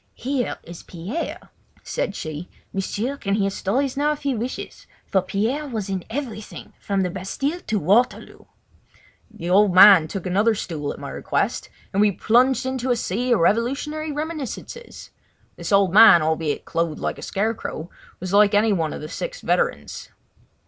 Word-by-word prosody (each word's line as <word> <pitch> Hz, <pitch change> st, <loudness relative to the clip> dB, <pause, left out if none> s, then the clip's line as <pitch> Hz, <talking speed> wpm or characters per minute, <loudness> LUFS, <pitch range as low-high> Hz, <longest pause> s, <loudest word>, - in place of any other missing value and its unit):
"Here 260 Hz, 0 st, -2 dB
is 170 Hz, 0 st, -10 dB
Pierre," 190 Hz, -, -6 dB, 0.3 s
said 200 Hz, -, -3 dB
she. 155 Hz, +2 st, -6 dB, 0.2 s
"M'sieur 210 Hz, +7 st, -2 dB
can 200 Hz, -6 st, -1 dB
hear 195 Hz, -2 st, 0 dB
stories 255 Hz, +9 st, -1 dB
now 295 Hz, +2 st, +1 dB
if 295 Hz, -, -11 dB
he 280 Hz, -1 st, 0 dB
wishes, 240 Hz, +2 st, -6 dB, 0.2 s
for 190 Hz, -, +1 dB
Pierre 220 Hz, +11 st, -2 dB
was 220 Hz, -6 st, -4 dB
in 190 Hz, -2 st, -2 dB
everything, 225 Hz, -4 st, -6 dB
from 200 Hz, -1 st, -1 dB
the 180 Hz, -2 st, -1 dB
Bastille 275 Hz, -, -3 dB
to 215 Hz, -, 0 dB
Waterloo." 205 Hz, +8 st, +1 dB, 0.8 s
The 195 Hz, -6 st, -5 dB
old 195 Hz, -1 st, +4 dB
man 185 Hz, -4 st, +9 dB
took 195 Hz, +2 st, -6 dB
another 205 Hz, +5 st, +2 dB
stool 155 Hz, -7 st, -4 dB
at -, -, -8 dB
my -, -, -7 dB
request -, -, -2 dB, 0.2 s
and 200 Hz, -, +2 dB
we 210 Hz, -1 st, +4 dB
plunged 250 Hz, +7 st, +2 dB
into 260 Hz, -1 st, -2 dB
a 245 Hz, -, +3 dB
sea 235 Hz, +3 st, -2 dB
of 230 Hz, -, +3 dB
revolutionary 275 Hz, -, 0 dB
reminiscences. 310 Hz, -, -6 dB, 0.4 s
This -, -, -6 dB
old 195 Hz, -3 st, +4 dB
man, 210 Hz, -6 st, +8 dB
albeit 160 Hz, -1 st, -1 dB
clothed 165 Hz, -2 st, -2 dB
like -, -, -3 dB
a -, -, -9 dB
scarecrow, 195 Hz, -5 st, -3 dB, 0.3 s
was 185 Hz, +1 st, -5 dB
like 205 Hz, 0 st, +5 dB
any 210 Hz, +1 st, +4 dB
one 165 Hz, -5 st, -1 dB
of -, -, -7 dB
the 150 Hz, -, -6 dB
six -, -, -6 dB
veterans. -, -, -1 dB
210 Hz, 165 wpm, -22 LUFS, 185-255 Hz, 0.8 s, man